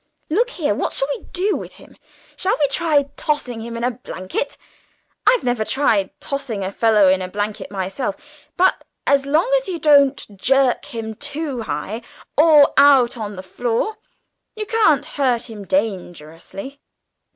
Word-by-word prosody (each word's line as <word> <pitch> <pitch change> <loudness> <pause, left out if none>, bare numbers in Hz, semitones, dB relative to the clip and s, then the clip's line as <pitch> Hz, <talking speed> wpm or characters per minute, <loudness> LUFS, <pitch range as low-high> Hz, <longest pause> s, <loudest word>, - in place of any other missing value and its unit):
"Look 470 +9 +2
here, 315 - -1
what - - -2
shall 270 - +2
we - - -12
do 390 +3 -1
to - - -9
him? - - -17 0.4
Shall 380 +2 0
we 290 - +3
try 295 0 +2
tossing 255 -6 -2
in 230 +1 -5
a 250 - +1
blanket? 235 +1 -5 0.7
I've - - +5
never 245 -3 0
tried 215 -6 +1
tossing 245 -8 -4
a 190 - -3
fellow 215 -2 +4
in 185 0 +3
one 205 +3 -3
myself, 195 +3 -3 0.4
but 370 +1 +3 0.2
as 275 -1 +2
long 310 +9 +2
as - - -11
you 365 -3 -3
don't 280 -8 +3
jerk 265 +4 +2
him 225 -1 -6
too 285 +1 -4
high, 195 +6 -4 0.3
or 300 -1 +6
out 270 -4 +6
on 210 -3 -5
the 185 - -8
floor, 240 - -2 0.6
you 430 -1 -4
can't 410 - +3
hurt 250 -4 -1
him 205 -2 -8
dangerously." 195 - -4
255 Hz, 150 wpm, -20 LUFS, 210-290 Hz, 0.7 s, or